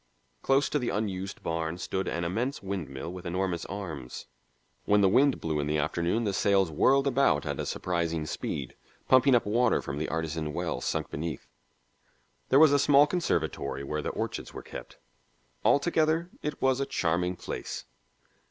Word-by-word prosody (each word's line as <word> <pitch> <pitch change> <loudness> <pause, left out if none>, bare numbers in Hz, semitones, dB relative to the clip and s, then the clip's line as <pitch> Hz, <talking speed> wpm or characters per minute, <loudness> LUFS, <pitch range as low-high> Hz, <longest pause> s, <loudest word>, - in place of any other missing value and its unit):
Close 135 +2 +3
to 150 - 0
the 125 - -1
unused 100 -2 -3
barn 80 0 -2
stood 95 +1 -3
an 85 - -2
immense 115 +11 -2
windmill 85 -5 -5
with 90 -1 -8
enormous 90 -1 -1
arms; 80 -10 -6 0.6
when 105 0 +4
the 100 - +5
wind 135 +7 +4
blew 80 -2 -1
in 70 - -1
the 75 +1 +1
afternoon 85 +9 0
the 100 -3 -1
sails 95 -3 +2
whirled 135 - +3
about 140 0 +2
at - - -3
a - - -2
surprising 85 -3 -1
speed, 70 -3 -4 0.3
pumping 130 0 +6
up 120 - +2
water 115 +3 +2
from 70 0 -5
the 80 - -2
artesian 80 -1 -2
well - - -2
sunk - - -2
beneath. 80 -2 -4 1.0
There 135 - +5
was 150 -1 +7
a 145 - +4
small 140 +1 +6
conservatory 80 - -1
where 75 +2 -3
the - - -3
orchids - - -4
were - - -7
kept. - - -9 0.7
Altogether, 160 +3 +2
it 150 - -4
was 130 0 +3
a 140 - -1
charming 90 +2 0
place. - - -6
95 Hz, 170 wpm, -28 LUFS, 80-130 Hz, 1.0 s, was